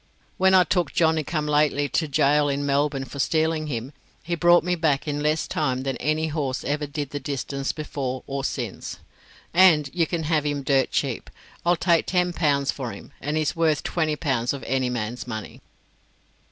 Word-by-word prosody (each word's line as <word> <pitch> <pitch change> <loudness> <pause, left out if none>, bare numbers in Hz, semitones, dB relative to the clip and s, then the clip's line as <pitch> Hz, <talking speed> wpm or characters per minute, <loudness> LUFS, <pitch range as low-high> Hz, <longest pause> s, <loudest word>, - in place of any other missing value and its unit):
When 190 0 +5
I 185 - +7
took 180 -1 0
Johnny 160 -3 +2
come 150 0 -2
lately 150 -1 +2
to 160 - 0
gaol 145 0 +3
in 140 +1 -1
Melbourne 140 -1 0
for 140 - -9
stealing 160 +1 +1
him, 125 -1 -4 0.3
he 175 - -3
brought 175 +1 +5
me 180 - 0
back 155 -4 +1
in 145 0 -2
less 155 +1 0
time 130 -4 -1
than 135 -1 -2
any 155 +4 0
horse 145 -4 -2
ever 150 +2 -1
did 145 -1 -4
the 145 - -3
distance 140 -1 -3
before 135 -4 -4
or 140 0 -4
since. 120 -6 -4 0.6
And 165 -6 +5
you 170 -2 +1
can 170 -2 -2
have 155 -1 +1
him 145 -1 -2
dirt 135 -1 +2
cheap. - - -2 0.3
I'll 175 +1 +3
take 170 -1 +2
ten 180 -1 +1
pounds 140 -5 +1
for 130 -4 -5
him, - - -11
and 150 +3 -2
he's 155 -2 0
worth 160 -3 +1
twenty 155 -3 0
pounds 130 -6 0
of 135 -4 -7
any 130 0 0
man's 120 0 -4
money." 110 -3 -6
150 Hz, 190 wpm, -24 LUFS, 135-160 Hz, 0.6 s, I